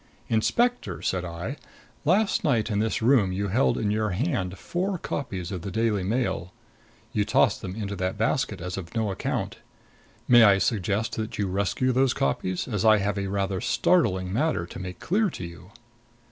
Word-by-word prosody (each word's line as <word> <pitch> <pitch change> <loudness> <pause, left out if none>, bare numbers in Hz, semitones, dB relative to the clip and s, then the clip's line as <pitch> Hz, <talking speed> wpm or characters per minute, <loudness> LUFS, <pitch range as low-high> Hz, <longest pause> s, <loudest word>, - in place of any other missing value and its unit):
"Inspector," 240 - +1
said 90 -1 0
I, 85 - -5 0.5
"last 195 +7 +2
night 120 -7 +1
in 100 - +1
this 110 +1 0
room 115 -6 +4
you 100 +2 -2
held 125 +8 +2
in 105 -2 0
your 110 0 0
hand 100 - -1
four 185 - -2
copies 95 - -4
of 90 -3 -4
the 100 - -5
Daily 110 0 0
Mail. 95 -4 -1 0.6
You 105 - +2
tossed 100 -1 +2
them 95 0 -5
into 100 -2 -4
that 95 +3 -2
basket 110 -3 0
as 90 +2 -4
of 85 -3 -8
no 110 -3 0
account. 95 - -3 0.7
May 120 -1 +7
I 100 -3 +7
suggest 105 +1 0
that 110 0 -4
you 100 - 0
rescue 100 +7 0
those 130 0 +2
copies, 90 +7 -1
as 105 -6 -2
I 110 -1 +6
have 100 0 -1
a 100 - -2
rather 95 -1 -1
startling 115 - +2
matter 135 - 0
to 90 - -9
make 90 -1 -7
clear 205 +3 +1
to 90 - -7
you?" 85 +1 -11
105 Hz, 180 wpm, -26 LUFS, 95-120 Hz, 0.7 s, May